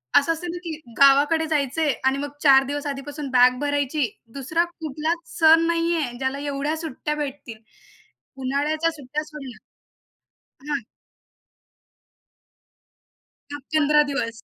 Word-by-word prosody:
असं 285 +4 +5
असतं 340 +2 -7
ना, 350 - -6
की 320 -3 -5 0.2
गावाकडे 285 +4 +5
जायचं 295 0 -1
आहे 295 -3 +3
आणि 265 +1 +3
मग 290 +1 -4
4 270 -2 +7
दिवस 290 +1 -4
आधीपासून 285 +1 -5
बॅग 250 0 +5
भरायची. 285 -3 0 0.2
2रा 300 +5 0
कुठलाच 325 0 -5
सण 325 +1 +6
नाही 335 0 +1
आहे, 245 -7 -3
ज्याला 265 +1 -2
एवढ्या 285 +1 -2
सुट्ट्या 300 -1 -4
भेटतील, 280 -6 -6 0.8
उन्हाळ्याच्या 295 +5 0
सुट्ट्या 295 0 -5
सोडल्या 280 -6 -10 1.2
हा. 280 -3 -1 2.7
10-15 300 +1 +2
दिवस. 230 -5 -3
290 Hz, 120 wpm, -23 LUFS, 275-315 Hz, 2.7 s, 4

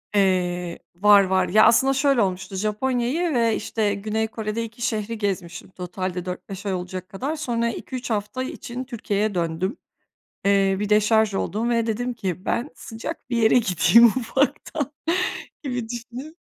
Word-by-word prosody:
Eee, 180 -3 +1 0.2
var, 200 +2 +6
var. 185 -1 +1
Ya, 215 +4 +6
aslında 265 +4 +5
şöyle 275 -2 +3
olmuştu, 190 0 -2
Japonya'yı 245 - 0
ve, 230 -3 +2
işte, 220 -1 -1
Güney 215 +2 -1
Kore'de 220 0 -3
2 230 +1 -9
şehri 225 -1 -2
gezmiştim 185 -5 -3
totalde 180 0 -5
4-5 185 +2 -6
ay 195 - 0
olacak 185 0 -5
kadar. 260 +10 -3
Sonra 235 -6 -1
2-3 250 +2 -6
hafta 210 +3 -2
için 255 -1 -6
Türkiye'ye 215 -5 -2
döndüm. 175 - -1 0.7
Eee, 195 -1 +3
bir 210 - -1
deşarj 215 0 +3
oldum 220 +4 -1
ve 230 -1 +1
dedim 245 +3 -2
ki: 190 -5 -4
"Ben 245 +5 -1
sıcak 240 +5 -7
bir 240 - 0
yere 225 -1 +4
gideyim, 230 +3 +6
ufaktan." 275 +3 -1 0.7
gibi 245 -5 -3
düşünüp 245 +6 -7
215 Hz, 150 wpm, -23 LUFS, 195-240 Hz, 0.7 s, var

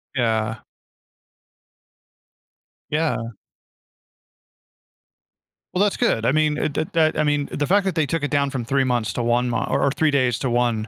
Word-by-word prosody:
Yeah. 110 -3 0 2.3
Yeah. 155 +1 0 2.6
Well, 185 +3 +2
that's 205 - +1
good. 115 - +1
I 125 - +3
mean, 155 0 +1
uh, - - 0
th 155 - -2
that 160 -1 +2
I - - +3
mean 145 -1 0
the 145 - -2
fact 200 +2 +3
that 190 - 0
they 155 -2 +2
took 165 +1 -2
it 145 - -2
down 140 -1 +1
from 130 -4 -4
3 135 +2 +1
months 120 -6 -1
to 120 - -2
1 120 +1 +1
mon 115 -3 -1
or - - +1
or 140 - +3
3 155 +2 +1
days 130 -4 +1
to 130 - -1
1, 120 -2 0
135 Hz, 170 wpm, -22 LUFS, 120-155 Hz, 2.6 s, I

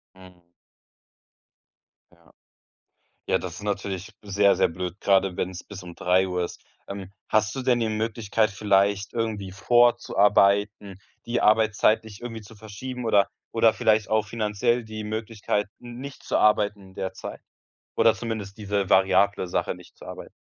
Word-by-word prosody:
Mhm. 90 -2 -18 1.6
Ja. 85 -1 -24 0.9
Ja, - - +2
das - - -6
ist - - -10
natürlich 100 -1 -3
sehr, 100 -1 +3
sehr - - +2
blöd 90 +2 -6
gerade, 95 -2 +2
wenn's 90 0 -4
bis 100 -2 -10
um 90 -1 -10
03:00 90 0 +1
ist. - - -8 0.3
Ähm, 100 -1 -7 0.2
hast 110 0 +1
du 135 - -4
denn 125 -2 +2
die 115 - 0
Möglichkeit 110 0 0
vielleicht, 100 -1 +1
irgendwie 110 -4 -2
vorzuarbeiten, 100 -2 +3 0.3
die 120 +1 -1
Arbeitszeit 110 0 +3
nicht 105 -2 -11
irgendwie 115 -2 -7
zu 105 +2 -14
verschieben 115 +4 -7
oder 100 -3 +3 0.2
oder 115 -1 +4
vielleicht 110 -1 +1
auch 110 0 +2
finanziell 115 +2 0
die 110 -1 -7
Möglichkeit, 105 -1 -2
n 120 0 -9
nicht 140 0 -9
zu - - 0
arbeiten 105 -2 +2
der 95 0 -4
Zeit? - - -8 0.6
Oder - - +5
zumindest 110 -4 -5
diese 100 -3 -2
variable 95 +1 +3
Sache, - - -1
nicht - - -16
zu - - -14
arbeiten? - - -9
105 Hz, 150 wpm, -25 LUFS, 95-110 Hz, 1.6 s, Oder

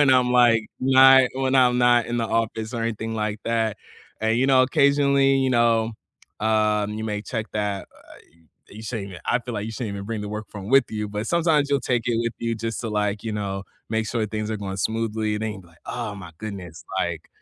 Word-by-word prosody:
when 145 -2 +5
I'm 125 -1 +4
like, 120 -2 +5 0.2
when 130 +1 +1
I 130 -1 +8
when 130 0 0
I'm 125 -2 +5
not 120 -1 +4
in 120 - -2
the 115 -1 0
office, 110 0 -2
or 115 - -2
anything 115 0 -3
like 105 -1 -2
that, 115 -2 0 0.4
and, 110 +1 +1
you 130 - +2
know, 130 -1 +5
occasionally 140 0 +3
you 135 -1 +1
know, 115 -2 +2 0.5
um, 105 -1 +1
you 110 +1 -4
may 105 -1 -2
check 110 -1 -4
that, 105 -2 -2
uh, - - -17 0.5
you 110 +2 -10
shouldn't 110 -3 -5
even, 90 -4 -10
I 120 - +2
feel 120 0 -7
like 105 0 -3
you 115 - -5
shouldn't 115 -2 -4
even 100 0 -6
bring 110 -1 -3
the 105 - -5
work 105 0 -5
phone 100 0 -8
with 135 0 +6
you, 105 -1 -3
but 105 +2 -4
sometimes 160 -4 +2
you'll 140 -1 +2
take 120 -1 +2
it 120 - +1
with 115 -1 -1
you 115 0 -1
just 115 0 -4
to 120 - -4
like, 105 -1 -1
you 110 - -3
know, 100 -2 -3 0.3
make 110 -1 0
sure 115 -2 -1
things 110 0 -4
are 110 - -1
going 95 -1 -5
smoothly, 110 0 -1
it 105 - -3
ain't, 105 -4 -5 0.2
"Oh 115 -4 -4
my 90 -4 -10
goodness, 95 -6 -7 0.2
like, - - -3
110 Hz, 225 wpm, -24 LUFS, 105-125 Hz, 0.5 s, I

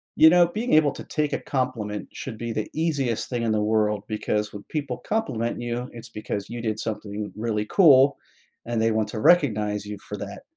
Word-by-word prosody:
You 160 - +8
know, 175 0 +6
being 220 +8 -2
able 155 -2 +5
to - - -8
take 150 -2 -2
a - - 0
compliment 120 -6 -3
should 115 -5 -6
be 115 0 -4
the 110 - -3
easiest 145 -8 -1
thing 120 -2 -2
in 115 -1 0
the 110 -1 +1
world 105 -1 +1
because 105 -1 -2
when 100 -1 -8
people 140 -5 -3
compliment 120 - -2
you, 120 +1 -3
it's 120 0 -10
because 105 -2 -5
you 120 0 -5
did 110 -2 -2
something 105 -1 -4
really 105 -1 -1
cool 140 - +6 0.5
and 120 -1 -1
they 115 0 +2
want 110 -1 0
to 110 - -4
recognize 105 -9 +3
you 105 0 -5
for 105 - -8
that. 100 0 -7
115 Hz, 205 wpm, -25 LUFS, 105-135 Hz, 0.5 s, You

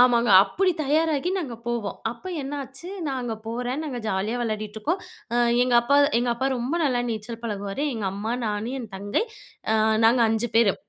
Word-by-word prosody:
ஆமாங்க. 240 -2 +5
அப்படி 370 - +1
தயாராகி 310 +2 +1
நாங்க 280 -10 -4
போவோம். 235 -4 -2
அப்ப 235 +9 -11 0.2
என்னாச்சு, 275 +3 -6 0.2
நா 275 - -1
அங்க 240 -2 -3
போறேன். 245 +4 -2
நாங்க 265 -5 -4
ஜாலியா 200 +5 -1
வெளையாடிட்ருக்கோம். 220 - -2 0.3
அ - - +2 0.3
எங்க 250 -1 +2
அப்பா 280 +4 +3 0.2
எங்க 240 0 +1
அப்பா 260 +3 0
ரொம்ப 245 +6 -2
நல்லா 245 -3 +1
நீச்சல் 225 +1 -5
பழகுவாரு. 205 +4 -3
எங்க 215 -4 -2
அம்மா, 220 +4 -2
நானு, 210 +3 -2
என் 225 -4 -8
தங்கை 205 - -1 0.5
அ - - +3 0.3
நாங்க 240 +2 +4
5 225 +1 0
பேரு. 220 -5 +5
240 Hz, 170 wpm, -25 LUFS, 215-270 Hz, 0.5 s, ஆமாங்க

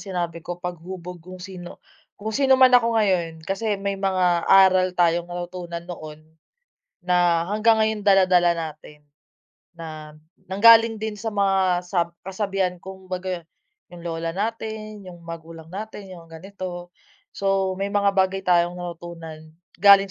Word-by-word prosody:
sinabi 175 -3 -4
ko 175 +2 -6
paghubog 180 0 -7
kung 185 +2 -11
sino 180 -2 -9 0.4
kung 215 +2 -5
sino 270 +2 +4
man 260 -1 +7
ako 235 -2 +4
ngayon 175 -6 0
kasi 205 +3 -1
may 195 0 -3
mga 185 -3 +1
aral 185 -1 +5
tayong 170 0 +2
natutunan 175 -1 -6
noon, 155 -3 -9 0.8
na 175 -2 +2
hanggang 215 +3 +3
ngayon 220 -1 +1
dala-dala 185 -3 +4
natin. 150 -2 -8 0.7
Na 155 -2 -9 0.3
nanggaling 225 +3 +6
din 220 0 -4
sa 210 +2 -5
mga 190 -3 +1
sa 180 -1 +1
sab 170 - -7 0.2
kasabihan 195 -1 -1
kumbaga 185 -2 -6 0.5
'yung 175 - -11
lola 165 -1 -4
natin, 215 0 -4
'yung 175 -2 -11
magulang 165 -1 -10
natin, 205 0 -8
'yung 170 -2 -11
ganito. 175 +1 -8 0.4
So 195 -1 0
may 200 +1 -2
mga 200 -1 +3
bagay 190 0 +1
tayong 175 -1 +2
natutunan 165 -3 -9 0.2
galing 200 +1 +7
185 Hz, 135 wpm, -23 LUFS, 170-200 Hz, 0.8 s, man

